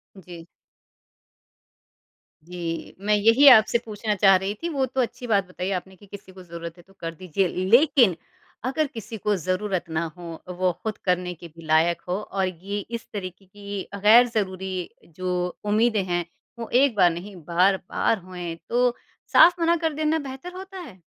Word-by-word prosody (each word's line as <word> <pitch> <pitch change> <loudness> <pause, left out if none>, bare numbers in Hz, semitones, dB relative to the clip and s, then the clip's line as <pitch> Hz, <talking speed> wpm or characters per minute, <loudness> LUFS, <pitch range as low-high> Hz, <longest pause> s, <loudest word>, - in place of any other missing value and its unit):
जी। 175 -2 -12 2.0
जी, 170 -1 -6
मैं 210 +1 +1
यही 230 +7 +5
आपसे 220 -1 +6
पूछना 210 0 -2
चाह 195 -1 +6
रही 190 +2 -1
थी 340 - -1
वो 275 -4 0
तो 260 +1 -1
अच्छी 245 +1 -4
बात 200 -3 +2
बताई 185 +1 -5
आपने 190 +1 -10
कि 205 - -18
किसी 195 -1 -11
को 185 -1 -13
ज़रूरत 170 0 -8
है 175 - -16
तो 195 - -23
कर 165 -1 -5
दीजिए। 185 +2 -1
लेकिन 230 - +4 0.5
अगर 295 +3 0
किसी 225 -2 -8
को 210 +1 0
ज़रूरत 185 0 -2
ना 160 +1 -1
हो 170 -2 -9 0.2
वो 185 -1 +2
खुद 220 -2 -3
करने 180 0 0
के 170 +1 -12
भी 165 0 -15
लायक 160 +2 +2
हो 185 +3 -1
और 195 -2 -2
ये 190 +4 -5
इस 230 +3 -7
तरीक़े 190 -1 -7
की 200 +1 -7
गैर-ज़रूरी 195 -4 +2 0.3
जो 180 -1 -2
उम्मीदें 215 -1 +2
हैं 175 -2 -1 0.3
वो 230 - -6
एक 255 -2 +4
बार 180 -3 +5
नहीं 190 +4 -8
बार-बार 190 +5 +1
होएँ 175 -2 -7
तो 245 0 +2 0.4
साफ़ 350 0 +7
मना 335 +1 +3
कर 320 -2 -1
देना 310 +1 0
बेहतर 275 +5 -8
होता 380 0 -8
है? 220 - -11
195 Hz, 170 wpm, -24 LUFS, 180-230 Hz, 2.0 s, साफ़